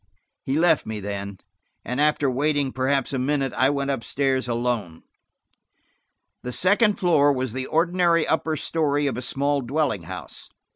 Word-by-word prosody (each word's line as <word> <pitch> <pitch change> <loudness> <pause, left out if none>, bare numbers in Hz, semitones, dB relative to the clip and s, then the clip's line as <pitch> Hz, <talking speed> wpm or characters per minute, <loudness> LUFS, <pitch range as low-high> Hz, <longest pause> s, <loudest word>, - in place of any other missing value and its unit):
He 135 +2 -2
left 160 -2 +3
me 110 -1 -4
then, 100 -1 -5 0.5
and 125 +3 -1
after 150 -1 +2
waiting 140 +1 0
perhaps 135 +1 0
a 135 - -1
minute, 135 0 -1
I 130 - +3
went 140 -1 -1
up 135 -4 -3
stairs 135 -2 0
alone. 120 -8 -2 1.4
The 125 - -5
second 205 - +3
floor 155 -5 +4
was 130 -4 -2
the 130 0 -4
ordinary 170 0 +2
upper 160 0 0
story 145 -2 0
of 140 - -1
a 125 - -4
small 140 +2 0
dwelling 130 - -1
house. - - -8
140 Hz, 155 wpm, -23 LUFS, 125-150 Hz, 1.4 s, floor